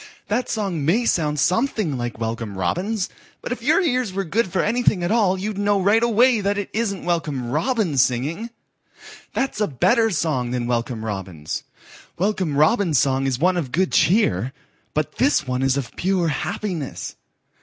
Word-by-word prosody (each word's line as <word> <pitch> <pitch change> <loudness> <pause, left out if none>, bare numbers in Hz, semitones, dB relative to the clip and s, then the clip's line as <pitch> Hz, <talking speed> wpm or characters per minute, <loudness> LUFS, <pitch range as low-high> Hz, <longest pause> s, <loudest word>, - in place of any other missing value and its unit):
That 235 +5 0
song 195 -8 -2
may 205 +11 +2
sound 150 -7 +1
something 205 - +1
like 120 -2 -4
Welcome 115 -3 -4
Robin's, 185 - -1 0.3
but - - -7
if 250 - -3
your 305 +9 +3
ears 255 - +1
were 195 +1 -2
good 205 +5 0
for 185 - +1
anything 215 -5 +1
at 175 - 0
all 205 -5 +3
you'd 200 +1 -4
know 205 0 +2
right 205 +4 +3
away 235 0 +4
that 200 +1 0
that 205 -1 -3
isn't 205 -5 -2
Welcome 150 -8 -1
Robin 215 - 0
singing. 140 - 0 0.9
That's 270 -5 -1
a 210 - +3
better 225 - +2
song 150 - -1
than 125 -1 -2
Welcome 120 -1 -2
Robin's. 95 -7 -5 0.5
Welcome 185 -6 0
Robin's 160 - +3
song 135 +1 +2
is 130 -2 0
one 180 +6 +2
of 145 -8 -3
good 185 +5 +1
cheer, 130 - +2 0.4
but 155 -1 -2
this 270 - +2
one 125 0 -2
is 135 0 +2
of 130 -4 -5
pure 180 -2 +1
happiness. 155 +1 -4
180 Hz, 170 wpm, -22 LUFS, 135-215 Hz, 0.9 s, away